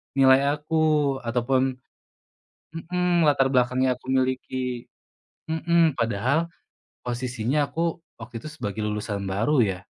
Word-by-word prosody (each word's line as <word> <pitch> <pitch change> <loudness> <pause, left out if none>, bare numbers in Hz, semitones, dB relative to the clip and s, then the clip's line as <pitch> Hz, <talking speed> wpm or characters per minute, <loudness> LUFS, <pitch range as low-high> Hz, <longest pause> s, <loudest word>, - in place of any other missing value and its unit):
nilai 135 +2 +5
aku 150 -2 +1
ataupun 130 +2 0 1.0
mhm, 175 -1 +1
latar 135 -2 +3
belakang 125 +1 +2
yang 130 - +3
aku 130 - -16
miliki 130 -1 -1 0.6
mhm, 165 -2 +2
padahal 120 +8 +1 0.6
posisinya 125 +3 -1
aku 170 0 -2 0.2
waktu 115 0 -8
itu 155 - -7
sebagai 110 -9 -5
lulusan 105 -1 -3
baru 115 +8 +2
ya 95 -4 -1
130 Hz, 115 wpm, -25 LUFS, 120-155 Hz, 1.0 s, nilai